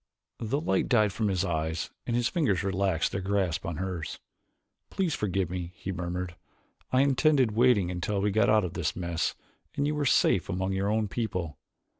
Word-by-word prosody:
The 120 +6 -1
light 95 - 0
died 110 -6 +3
from 110 - 0
his 95 -3 0
eyes 80 -1 -2 0.2
and 120 - 0
his 120 0 +2
fingers 130 - +1
relaxed 95 -3 0
their 100 - -2
grasp 95 -4 0
on 85 - -3
hers. 90 -3 -4 0.7
"Please 185 -5 0
forgive 95 - -1
me," 90 -1 -4
he 95 - -5
murmured. 90 0 -4 0.6
"I 130 - +4
intended 135 -2 +3
waiting 110 -5 +3
until 90 +3 -2
we 100 +1 +1
got 110 +2 +3
out 105 -2 +4
of 85 - -5
this - - -2
mess 85 -2 -1 0.4
and 140 - 0
you 150 - +1
were 150 -1 -1
safe 95 -6 +3
among 95 0 -1
your 95 +1 0
own 110 0 +1
people. 90 - -3
100 Hz, 185 wpm, -28 LUFS, 90-115 Hz, 0.7 s, I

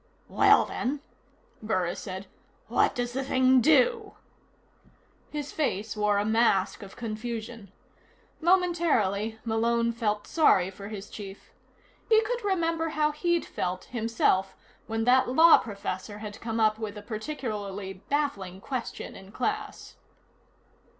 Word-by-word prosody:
"Well, - - +5
then," 275 +3 -3 0.6
Burris 185 -5 -1
said, 190 -1 -6 0.4
"what - - +2
does 245 0 -2
the 270 +1 -1
thing 260 -1 +4
do?" 445 - +3 1.1
His 295 -1 -5
face 220 -9 -2
wore 210 -1 +2
a 205 - +1
mask 220 -3 +2
of 195 -1 -11
confusion. 225 -2 -6 0.7
Momentarily, 320 - +2
Malone 235 +1 +1
felt 215 -3 -1
sorry 190 - +3
for 200 +1 -9
his 205 -1 -7
chief. 200 -2 -10 0.6
He 440 -1 +7
could 485 +2 -3
remember 330 -4 0
how 305 -1 +1
he'd 345 +2 0
felt, 185 +1 -3
himself, 225 -5 +1 0.3
when 225 0 -1
that 250 +2 +4
law 320 +6 +7
professor 205 -1 -5
had 210 -1 -8
come 230 0 -3
up 215 0 +3
with 215 -2 -5
a 205 - -8
particularly 210 -5 -5
baffling 195 -5 -3
question 250 +3 -5
in 190 +1 -12
class. 425 - -4
225 Hz, 125 wpm, -27 LUFS, 205-295 Hz, 1.1 s, He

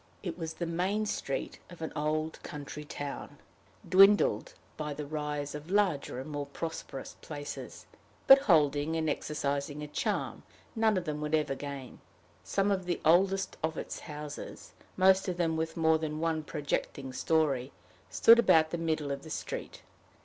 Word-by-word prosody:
It 175 -4 -3
was 165 -2 -5
the 170 - -3
main 185 +6 0
street 140 -9 -3
of 175 - -12
an 160 - -4
old 155 +1 -1
country 150 +1 -7
town, 145 -1 -6 0.5
dwindled 200 - +5 0.2
by 150 -2 -4
the 150 - -5
rise 150 -1 -3
of 150 +2 -8
larger 185 -10 +1
and 130 - -6
more 145 -2 -4
prosperous 140 -2 -6
places, 145 -2 -7 0.4
but 270 0 +10
holding 155 - +3
and 160 -1 0
exercising 145 -1 -2
a - - -5
charm 150 - -2 0.3
none 220 -2 +3
of 180 - -2
them 150 -1 -3
would 150 +1 +1
ever 150 -3 0
gain. 140 -2 -7 0.4
Some 200 +1 +1
of 190 -2 0
the 175 - -1
oldest 190 +4 +3
of 160 0 -1
its - - -5
houses, 150 -1 -8 0.2
most 190 +1 +5
of 180 -1 -2
them 165 -2 +1
with 160 +1 -2
more 160 -1 +4
than 155 -1 -3
one 160 -1 0
projecting 145 -3 -3
story, 140 -3 +1 0.4
stood 230 +1 +7
about 160 -8 +5
the 170 - -2
middle 155 -3 -1
of 140 0 -3
the 160 - -11
street. - - -5
155 Hz, 165 wpm, -30 LUFS, 145-175 Hz, 0.5 s, but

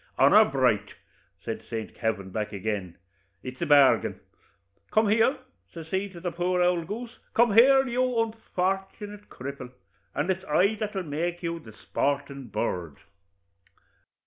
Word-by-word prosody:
'Honor - - +7
bright!' - - +1 0.5
says - - -3
St. 110 -1 -5
Kavin, 100 -4 -3
back 105 +1 -3
agin, 100 -3 -4 0.5
'it's 130 0 -8
a - - 0
bargain. 145 -2 +5 0.7
Come 215 -1 +3
here!' 225 +6 +3 0.3
says 165 -1 -9
he 190 +2 -1
to 180 -3 -11
the 175 0 -3
poor 180 +2 0
ould 175 -2 +2
goose 230 +4 -7 0.2
'come 235 -2 +4
here, 265 +4 +7
you 245 +1 0 0.2
unfort'nate 195 -2 -2
ould 205 0 -13
cripple, 130 -1 -7 0.4
and 150 +7 +1
it's 190 0 -3
I 190 +7 +3
that'll 210 -3 -3
make 170 +3 -3
you 170 0 -2
the 110 -8 -13
sportin' 140 +3 -2
bird.' 90 -9 -3
175 Hz, 145 wpm, -27 LUFS, 130-205 Hz, 0.7 s, Honor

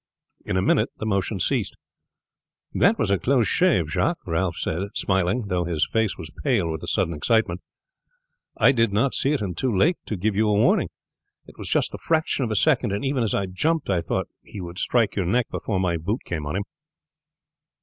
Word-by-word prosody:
In 95 - -2
a 95 - +1
minute - - +2
the - - -5
motion 100 -5 -1
ceased. - - 0 1.0
"That - - +3
was - - 0
a 100 - +2
close 125 +4 +2
shave, 185 0 +2
Jacques," 170 0 +1
Ralph 85 0 -1
said 80 - -2 0.2
smiling, 95 +4 +1
though 90 -3 0
his 85 -3 0
face 110 -3 +1
was 80 -3 -8
pale 105 - +1
with 80 - -4
the - - -7
sudden 85 - +1
excitement. 90 +2 +1 1.0
"I - - +6
did 115 -5 +2
not 115 +7 +1
see 140 - +1
it 145 - -1
until 95 +7 -2
too 105 - 0
late 170 - +3
to 105 - -3
give 100 +3 0
you 110 +2 +2
warning. 105 0 +3 0.6
It - - -17
was - - -5
just - - +1
the - - -7
fraction 160 -4 0
of 120 - -1
a 110 - -1
second, 135 -3 +2
and 100 +6 -2
even 135 -1 0
as 115 - 0
I 100 - 0
jumped 145 - -1
I 90 -3 +1
thought - - -2
he - - -10
would 85 0 -6
strike 115 -4 +1
your 95 -4 -1
neck 120 +5 +1
before 100 -4 -2
my 90 -2 0
boot 100 +10 -2
came 75 -4 -4
on 75 - -3
him." 100 - -1
100 Hz, 210 wpm, -24 LUFS, 90-120 Hz, 1.0 s, I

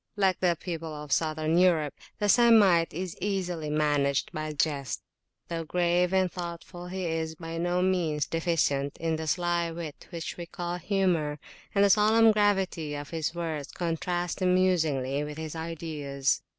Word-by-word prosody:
Like 190 -3 +2
the 175 -2 +2
people 165 -3 -5
of 150 -1 -8
Southern 155 +2 +1
Europe, 165 -5 +3 0.2
the 205 - 0
Semite 205 -7 +5
is 180 +1 -5
easily 180 -5 -2
managed 145 -2 +1
by 155 -3 -4
a 155 - -4
jest: 140 -3 -1 0.4
though 165 -1 -3
grave 175 +2 +1
and 190 -2 +2
thoughtful, 175 0 -7
he 185 0 -4
is 160 -1 -2
by 165 0 -6
no 175 +1 +1
means 170 -5 +1
deficient 155 -4 0
in 160 -1 -1
the 160 0 -5
sly 175 +1 +1
wit 165 -3 -7
which 170 -2 -5
we 170 -1 -6
call 175 +1 -4
humour, 175 -5 0 0.4
and 200 - +5
the 200 - +5
solemn 220 +2 +6
gravity 190 -7 +1
of 145 0 -7
his 160 0 -2
words 160 -4 -4
contrasts 175 +1 -2
amusingly 160 -7 +2
with 150 0 -6
his 160 0 -5
ideas. 155 -4 -2
170 Hz, 160 wpm, -28 LUFS, 155-180 Hz, 0.4 s, solemn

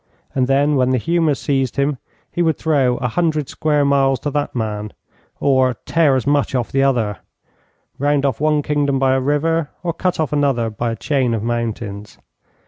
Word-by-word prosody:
And 130 -1 +1
then, 140 +2 +2
when 130 -1 +2
the 130 - +2
humour 165 +2 +1
seized 135 -3 -1
him, 140 -1 0 0.3
he 175 - -2
would 160 -2 +2
throw 135 -6 +1
a 125 - -1
hundred 155 +1 0
square 150 -2 +1
miles 135 -1 +2
to 145 - -2
that 145 -1 -2
man, 105 -2 -3 0.5
or 130 -2 +2
tear 160 -5 +3
as 130 - -1
much 145 -1 +1
off 120 -2 -1
the 135 - +2
other, 120 -7 +1 0.8
round 145 0 +1
off 135 -1 -1
one 150 -1 +2
kingdom 145 -2 0
by 135 0 +2
a 130 - +1
river, 150 +3 0
or 170 -1 -1
cut 180 +1 -1
off 155 -2 -1
another 135 -6 +1
by 115 +3 -2
a - - -4
chain 130 -3 0
of 110 - -3
mountains. 110 -3 -4
135 Hz, 190 wpm, -19 LUFS, 125-150 Hz, 0.8 s, tear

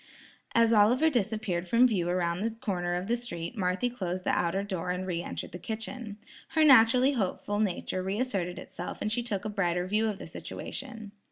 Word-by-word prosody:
As 230 0 +5
Oliver 245 +9 +5
disappeared 215 -7 -1
from 235 +7 +5
view 180 -7 0
around 175 0 0
the 225 - +1
corner 180 -7 -2
of 180 +1 -2
the 235 - +2
street, 235 -6 -6
Marthy 185 +3 0
closed 185 -7 -3
the - - +1
outer 175 +3 +1
door 185 -4 -3
an 180 +1 -2
re 175 -2 -2
entered - - -6
the 180 - -7
kitchen. 220 +1 -6 0.4
Her 315 - +6
naturally 255 0 +7
hopeful 205 -3 -1
nature 185 -2 -1
re 190 +3 -2
asserted 195 -8 -1
itself - - -7
and 215 - -2
she 240 +2 +1
took 215 -5 -3
a - - -1
brighter 180 -4 0
view 215 +4 +2
of 210 -2 -2
the - - -8
situation. 225 -6 -7
205 Hz, 195 wpm, -29 LUFS, 180-230 Hz, 0.4 s, naturally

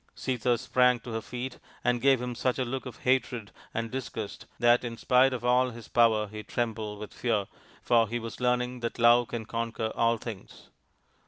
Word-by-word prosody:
Sita 125 -1 0
sprang 125 0 +3
to 120 - -8
her 115 0 -2
feet 125 +2 -6 0.2
and 120 -1 +1
gave 135 -2 +4
him 125 0 -3
such 125 +1 0
a 130 - 0
look 130 +2 -4
of 120 -2 -10
hatred 125 -4 0 0.2
and 115 0 -3
disgust 115 -5 -5
that 120 +1 +4
in 115 -1 -5
spite 130 +2 +4
of 125 -2 -4
all 125 +1 +4
his 115 -1 -10
power 110 -3 +3
he 105 +1 -7
trembled 110 -2 -3
with 105 0 -8
fear, 110 -5 0 0.4
for 115 -2 +4
he 120 - -1
was 115 +1 -7
learning 125 0 +1
that 115 -1 -4
love 120 0 +5
can 115 -2 -5
conquer 115 -1 -3
all 115 0 +2
things. 110 -4 -9
120 Hz, 190 wpm, -28 LUFS, 115-125 Hz, 0.4 s, love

